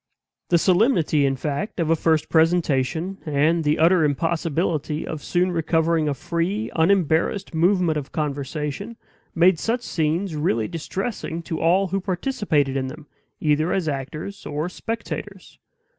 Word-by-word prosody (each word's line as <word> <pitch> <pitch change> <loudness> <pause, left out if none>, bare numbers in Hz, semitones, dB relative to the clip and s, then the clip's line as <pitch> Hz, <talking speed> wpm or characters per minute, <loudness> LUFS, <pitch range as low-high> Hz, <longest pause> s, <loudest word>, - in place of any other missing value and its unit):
The 175 - +5
solemnity, 175 - +3
in 135 - 0
fact, 150 - -3
of 165 -1 +1
a - - +5
first 160 -1 +1
presentation, 165 +1 +1
and 155 +2 +2
the 150 0 +2
utter 165 +1 +4
impossibility 160 0 -1
of 155 - -5
soon 180 +1 +1
recovering 165 -1 +1
a 140 - -1
free, 180 +9 -2
unembarrassed 170 +2 +2
movement 170 -1 +2
of 140 - -9
conversation, 150 - -3 0.4
made 175 0 +4
such 235 +6 -1
scenes 165 +1 -1
really 115 -8 0
distressing 170 0 -4
to 160 -1 -4
all 185 +4 +3
who 195 +2 -1
participated 180 - 0
in 130 -1 -1
them, 150 +3 -9 0.3
either 155 +2 +1
as 185 -4 0
actors 155 +8 -5
or 150 +3 -3
spectators. 210 -2 -6
165 Hz, 140 wpm, -23 LUFS, 150-185 Hz, 0.4 s, The